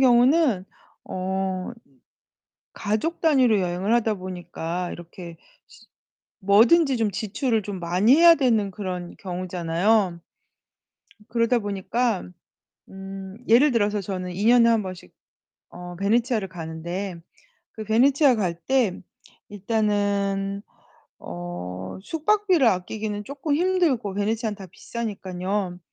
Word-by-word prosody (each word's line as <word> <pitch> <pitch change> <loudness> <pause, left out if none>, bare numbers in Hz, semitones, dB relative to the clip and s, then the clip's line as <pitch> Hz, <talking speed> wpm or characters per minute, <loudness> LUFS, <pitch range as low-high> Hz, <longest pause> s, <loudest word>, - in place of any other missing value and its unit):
경우는 250 - +4 0.4
어 185 0 -3 1.0
가족 220 +12 -2
단위로 260 -10 +4
여행을 185 +4 0
하다 225 -2 +2
보니까 180 -1 -5
이렇게 170 0 -10 1.0
뭐든지 245 - +5
좀 220 -2 +1
지출을 220 +3 -1
좀 195 -2 -6
많이 180 +9 +3
해야 335 +1 +8
되는 225 -7 +2
그런 180 -3 -6
경우잖아요. 180 +1 0 1.1
그러다 235 +1 +2
보니까 205 +1 -2 0.6
음 195 0 -9
예를 255 +7 +5
들어서 210 -3 +1
저는 185 -2 -5
2 200 +4 -2
년에 235 0 +6
1 225 -2 +2
번씩 185 -1 -9 0.6
어 175 0 -9
베네치아를 220 +2 +1
가는데 170 +3 -5 0.6
그 220 - -7
베네치아 265 +5 +4
갈 185 -5 -1
때 255 -8 +1 0.5
일단은 200 -1 -1 0.6
어 90 +2 -7
숙박비를 360 - +2
아끼기는 210 +2 -1
쪼끔 285 +4 -3
힘들고 320 - +1
베네치아는 215 +1 -1
다 195 -2 -10
비싸니깐요. 190 -2 -4
205 Hz, 240 characters per minute, -24 LUFS, 185-235 Hz, 1.1 s, 해야